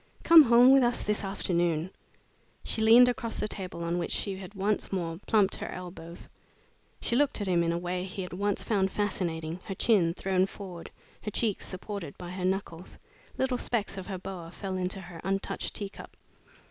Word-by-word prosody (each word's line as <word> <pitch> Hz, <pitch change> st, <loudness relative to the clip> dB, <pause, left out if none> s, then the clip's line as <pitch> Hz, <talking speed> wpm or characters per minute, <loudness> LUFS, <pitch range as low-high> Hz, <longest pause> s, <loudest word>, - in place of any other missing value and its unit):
Come 330 Hz, -1 st, +10 dB
home 240 Hz, +2 st, +7 dB
with 270 Hz, 0 st, +7 dB
us 240 Hz, -1 st, +1 dB
this 210 Hz, 0 st, 0 dB
afternoon." 175 Hz, -3 st, 0 dB, 0.7 s
She 220 Hz, -, -1 dB
leaned 230 Hz, +3 st, +8 dB
across 235 Hz, -2 st, -2 dB
the 210 Hz, -, -1 dB
table, 185 Hz, -4 st, -5 dB
on 170 Hz, +1 st, -1 dB
which 170 Hz, -, -2 dB
she 195 Hz, -2 st, -2 dB
had 190 Hz, +1 st, -10 dB
once 200 Hz, +2 st, -1 dB
more 170 Hz, -3 st, -2 dB
plumped 205 Hz, -3 st, +3 dB
her -, -, -5 dB
elbows. 175 Hz, -2 st, -8 dB, 0.7 s
She 235 Hz, -, +1 dB
looked 285 Hz, -1 st, +2 dB
at 205 Hz, -, -2 dB
him 180 Hz, -2 st, +2 dB
in 170 Hz, 0 st, +1 dB
a 170 Hz, -, 0 dB
way 180 Hz, +1 st, -3 dB
he 190 Hz, 0 st, -5 dB
had 180 Hz, -, -8 dB
once 200 Hz, +2 st, -1 dB
found 195 Hz, -3 st, +1 dB
fascinating 170 Hz, -5 st, -2 dB
her 195 Hz, -, -5 dB
chin 180 Hz, -8 st, +3 dB
thrown 190 Hz, -1 st, +1 dB
forward, 185 Hz, -4 st, -9 dB, 0.3 s
her -, -, -4 dB
cheeks 210 Hz, -1 st, -1 dB
supported 185 Hz, -4 st, -6 dB
by 175 Hz, -1 st, -7 dB
her 180 Hz, 0 st, -3 dB
knuckles. 185 Hz, -2 st, -3 dB, 0.4 s
Little 260 Hz, -2 st, 0 dB
specks 220 Hz, -5 st, -1 dB
of 190 Hz, -1 st, -7 dB
her 195 Hz, -3 st, -4 dB
boa 180 Hz, -2 st, -7 dB
fell 190 Hz, +2 st, -5 dB
into 185 Hz, +1 st, -2 dB
her 175 Hz, -2 st, -10 dB
untouched 195 Hz, 0 st, -2 dB
teacup. 200 Hz, -1 st, -8 dB
190 Hz, 185 wpm, -29 LUFS, 175-210 Hz, 0.7 s, Come